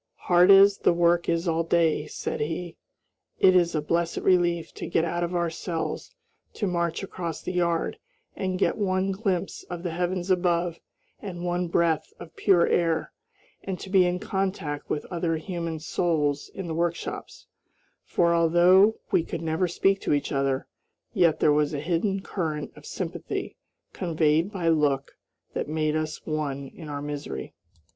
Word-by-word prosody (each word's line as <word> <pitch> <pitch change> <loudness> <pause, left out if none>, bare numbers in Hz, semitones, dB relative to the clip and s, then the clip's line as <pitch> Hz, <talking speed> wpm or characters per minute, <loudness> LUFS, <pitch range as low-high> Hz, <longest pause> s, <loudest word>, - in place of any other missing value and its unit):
"Hard 175 +1 +5
as 195 0 +7
the - - +3
work 170 0 +2
is 170 +1 0
all 165 0 +1
day," 165 -2 +2
said - - -4
he, 165 +3 -3 0.6
"it 185 -1 +5
is 175 -2 +3
a 150 - 0
blessed 170 +2 0
relief 175 -3 +2
to - - -6
get 165 - +2
out 175 +1 -1
of 175 +1 -2
our 170 -1 0
cells 165 - -4 0.4
to 210 - -2
march 170 -1 -1
across 170 -4 -5
the - - -3
yard 170 -2 0 0.4
and 185 -1 -2
get - - +1
one 190 -1 +1
glimpse 190 -3 -2
of 175 -1 -6
the 175 - -2
heavens 180 +2 -1
above, 175 -2 +1 0.4
and 180 -3 -6
one 175 0 0
breath 165 -2 +1
of 170 - -11
pure 180 -4 +4
air, 165 -2 +1 0.5
and 190 -2 -4
to 190 - -8
be 190 -2 +6
in 180 0 0
contact 190 -7 -3
with 150 - -2
other 170 -2 0
human 165 -1 -4
souls 150 -3 0
in 195 - -5
the 165 - -4
workshops, 170 +1 -3 0.6
for, 170 -1 +2
although 175 +5 +5 0.2
we - - +4
could 165 0 -5
never 165 +3 0
speak 195 +3 +1
to - - 0
each 145 - -1
other, 135 -2 0 0.5
yet 175 -7 +3
there 150 - +4
was 150 0 +1
a - - -2
hidden 180 +5 0
current 160 -7 -3
of - - -13
sympathy - - -4 0.4
conveyed 160 +1 +1
by 180 -5 -2
look 145 -4 +1 0.4
that - - -3
made 155 0 0
us 155 0 -3
one 140 -3 -3
in 160 -3 -10
our 145 0 -4
misery." 145 0 -5
170 Hz, 165 wpm, -26 LUFS, 160-180 Hz, 0.6 s, as